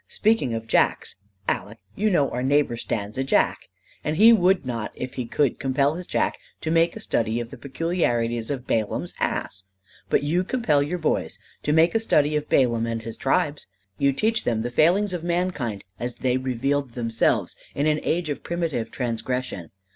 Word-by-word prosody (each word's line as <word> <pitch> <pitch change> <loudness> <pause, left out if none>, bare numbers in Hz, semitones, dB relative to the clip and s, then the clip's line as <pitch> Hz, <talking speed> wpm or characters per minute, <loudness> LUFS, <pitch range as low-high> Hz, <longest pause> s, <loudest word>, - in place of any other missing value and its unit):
Speaking 215 - +1
of 115 0 -4
jacks, - - +1 0.3
Aleck, 100 +4 -2 0.2
you 215 +2 +1
know 150 -8 +3
our 125 - -2
neighbor 140 -1 +2
stands 110 -1 -4
a - - +2
jack. 135 - +2 0.4
And 155 +1 -1
he 225 +4 +8
would 190 -5 +3
not 115 -4 -3
if 125 0 -5
he 125 -2 -4
could 140 +2 +1
compel 140 +2 +1
his 175 +2 -7
jack - - 0 0.2
to 160 - -2
make 165 +1 +3
a - - -6
study 115 - 0
of 120 -1 -6
the 135 - -9
peculiarities 120 -6 -1
of 135 -3 -3
Balaam's 110 -2 -1
ass. 95 - -2 0.5
But - - +2
you 170 +5 +1
compel 185 - +1
your 155 +6 -1
boys 160 -3 -1 0.2
to 150 - -1
make 160 +2 +4
a 225 - +3
study 150 -9 +2
of 150 0 -2
Balaam 115 -3 +3
and 115 -1 -3
his 115 0 -6
tribes. 145 +1 0 0.3
You 140 0 +4
teach 220 +11 0
them 110 -2 0
the 120 - -3
failings 185 +9 +3
of 175 -2 -3
mankind 170 - -1 0.2
as 120 0 -3
they 125 -1 0
revealed 130 +1 -1
themselves 115 -2 0 0.2
in 145 - 0
an 155 0 +2
age 170 -2 -1
of 145 - -4
primitive 165 -9 -2
transgression. 120 - -3
140 Hz, 185 wpm, -24 LUFS, 120-170 Hz, 0.5 s, he